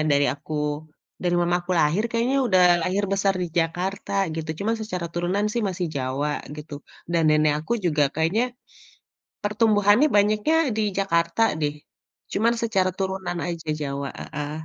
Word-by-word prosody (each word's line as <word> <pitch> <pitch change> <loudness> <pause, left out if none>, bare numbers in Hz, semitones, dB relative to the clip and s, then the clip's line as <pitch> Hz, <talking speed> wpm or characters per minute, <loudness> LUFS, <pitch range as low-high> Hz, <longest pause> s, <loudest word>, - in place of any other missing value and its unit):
dari 140 0 +4
aku 150 +3 -8 0.7
dari 175 -1 +1
mama 175 0 +2
aku 180 +1 -3
lahir 160 +8 +2
kayaknya 235 +4 +1
udah 185 -5 +4 0.2
lahir 190 +4 0
besar 195 0 +2
di - - -1
Jakarta, 180 +5 -2 0.2
gitu. 160 -1 -4
Cuman 220 +3 +1
secara 180 -5 -4
turunan 180 +4 0
sih 235 0 -1
masih 180 -1 -2
Jawa 135 +3 -1 0.3
gitu 150 0 -8 0.4
dan 170 -1 +2
nenek 155 0 +4
aku 160 - -4
juga 155 -4 +2
kayaknya, 165 +9 +1 1.0
pertumbuhannya 210 +3 +4
banyaknya 210 +9 +3 0.2
di 220 - +1 0.2
Jakarta 170 0 +1 0.2
deh, 145 -1 0 0.6
cuman 225 +3 +2
secara 195 -5 +1
turunan 190 -2 -2
aja 165 -2 -6
Jawa, 140 0 -3
heeh. 150 -1 -5
180 Hz, 150 wpm, -24 LUFS, 155-205 Hz, 1.0 s, dari